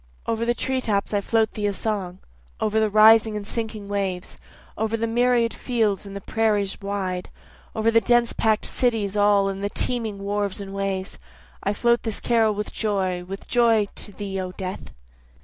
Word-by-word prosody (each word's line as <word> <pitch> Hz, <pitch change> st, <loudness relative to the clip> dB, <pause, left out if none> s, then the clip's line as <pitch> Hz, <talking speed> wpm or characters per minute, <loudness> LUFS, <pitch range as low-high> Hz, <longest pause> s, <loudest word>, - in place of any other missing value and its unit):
Over 230 Hz, 0 st, -1 dB
the 240 Hz, 0 st, +1 dB
tree 260 Hz, +1 st, -1 dB
tops 205 Hz, -3 st, -1 dB
I 205 Hz, -, +2 dB
float 220 Hz, +1 st, +1 dB
thee 210 Hz, -1 st, -1 dB
a 200 Hz, -, 0 dB
song, 195 Hz, -3 st, -3 dB, 0.4 s
Over 215 Hz, 0 st, +1 dB
the 220 Hz, -1 st, +2 dB
rising 215 Hz, +1 st, +6 dB
and 205 Hz, -, -6 dB
sinking 220 Hz, -2 st, -4 dB
waves, 195 Hz, -3 st, -3 dB, 0.4 s
over 220 Hz, +1 st, -1 dB
the 230 Hz, -, -1 dB
myriad 240 Hz, 0 st, +2 dB
fields 215 Hz, -5 st, -1 dB
and 200 Hz, -, -8 dB
the 200 Hz, -, -5 dB
prairies 210 Hz, -2 st, 0 dB
wide, 190 Hz, -2 st, -3 dB, 0.5 s
Over 220 Hz, +1 st, +2 dB
the 230 Hz, 0 st, +5 dB
dense 240 Hz, 0 st, +3 dB
pack'd 220 Hz, -1 st, +1 dB
cities 220 Hz, -5 st, 0 dB
all 205 Hz, -1 st, +4 dB
and 195 Hz, 0 st, -4 dB
the 200 Hz, -, 0 dB
teeming 225 Hz, -2 st, -2 dB
wharves 200 Hz, 0 st, -2 dB
and 195 Hz, -1 st, -7 dB
ways, 195 Hz, -1 st, -3 dB, 0.4 s
I 200 Hz, -, 0 dB
float 235 Hz, +3 st, +2 dB
this 225 Hz, -3 st, -2 dB
carol 225 Hz, -3 st, +2 dB
with 210 Hz, 0 st, -4 dB
joy, 190 Hz, -4 st, -1 dB
with 195 Hz, +2 st, -8 dB
joy 230 Hz, -3 st, +4 dB
to 205 Hz, -, -5 dB
thee 195 Hz, -2 st, -4 dB
O 185 Hz, 0 st, -5 dB
death. 185 Hz, -1 st, -6 dB
210 Hz, 185 wpm, -24 LUFS, 195-225 Hz, 0.5 s, rising